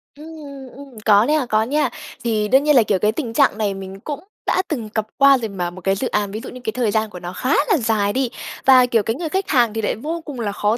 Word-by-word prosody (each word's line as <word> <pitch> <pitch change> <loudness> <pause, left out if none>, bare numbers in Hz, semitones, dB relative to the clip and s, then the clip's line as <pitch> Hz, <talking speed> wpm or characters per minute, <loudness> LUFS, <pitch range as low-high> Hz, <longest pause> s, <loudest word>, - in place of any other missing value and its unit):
Ừm, 300 +2 -12
ừm, 280 -3 -10
ừm, 275 -5 -12
có 210 +1 +5
nè, 300 -3 +1
có 215 0 +2
nha. 295 +6 0 0.3
Thì 215 -3 0
đương 265 +5 +4
nhiên 300 -1 +3
là, 240 - +6
kiểu, 200 -3 0
cái 210 +1 +2
tình 230 -2 -4
trạng 275 -6 +3
này 205 -2 0
mình 195 0 -8
cũng 295 +5 -5 0.3
đã - - +2
từng 235 -9 -4
cặp 215 0 -2
qua 275 -1 +6
rồi 225 -3 -4
mà, 180 -3 -3
một 180 +1 -11
cái 195 +2 +1
dự 255 - -2
án, 205 -1 -1
ví 215 - -5
dụ - - -7
như 255 - -10
cái 220 - -2
thời 240 -5 0
gian 220 0 0
của 180 - -9
nó 175 +1 -7
khá 260 +3 -1 0.2
là 385 - +4
dài 220 -4 0
đi. 260 -2 0 0.4
Và, 255 -2 +7
kiểu, 230 -4 +1
cái 225 +3 -1
người 325 0 -4
khách 380 +3 -2
hàng 240 -5 +3
thì 225 - -2
lại 210 - -1
vô 320 +9 -5
cùng 280 -5 -7
là 205 -3 -2
khó 210 +3 0
230 Hz, 290 wpm, -20 LUFS, 210-275 Hz, 0.4 s, Và